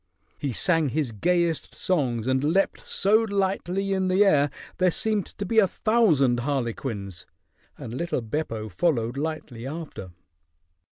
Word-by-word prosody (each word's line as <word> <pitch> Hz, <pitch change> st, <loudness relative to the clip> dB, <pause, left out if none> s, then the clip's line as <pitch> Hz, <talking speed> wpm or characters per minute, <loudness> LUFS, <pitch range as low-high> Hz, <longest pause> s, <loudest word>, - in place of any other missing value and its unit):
He 140 Hz, -, -2 dB
sang 165 Hz, -, +1 dB
his 140 Hz, -2 st, -1 dB
gayest 170 Hz, -, 0 dB
songs 125 Hz, -11 st, 0 dB
and 130 Hz, +1 st, +1 dB
leaped 180 Hz, +7 st, +1 dB
so 205 Hz, +3 st, +2 dB
lightly 195 Hz, -2 st, -1 dB
in 190 Hz, -1 st, 0 dB
the 190 Hz, +3 st, +4 dB
air, 145 Hz, -7 st, +4 dB, 0.3 s
there 185 Hz, 0 st, +4 dB
seemed 210 Hz, +2 st, 0 dB
to 205 Hz, -, -6 dB
be 225 Hz, +3 st, +3 dB
a 200 Hz, -, +5 dB
thousand 165 Hz, -, +3 dB
harlequins, 120 Hz, -7 st, -3 dB, 0.5 s
and 115 Hz, -, -7 dB
little 170 Hz, 0 st, -2 dB
Beppo 115 Hz, -3 st, -3 dB
followed 120 Hz, -, 0 dB
lightly 140 Hz, -5 st, -4 dB
after. 150 Hz, -, -7 dB
155 Hz, 135 wpm, -25 LUFS, 125-190 Hz, 0.5 s, a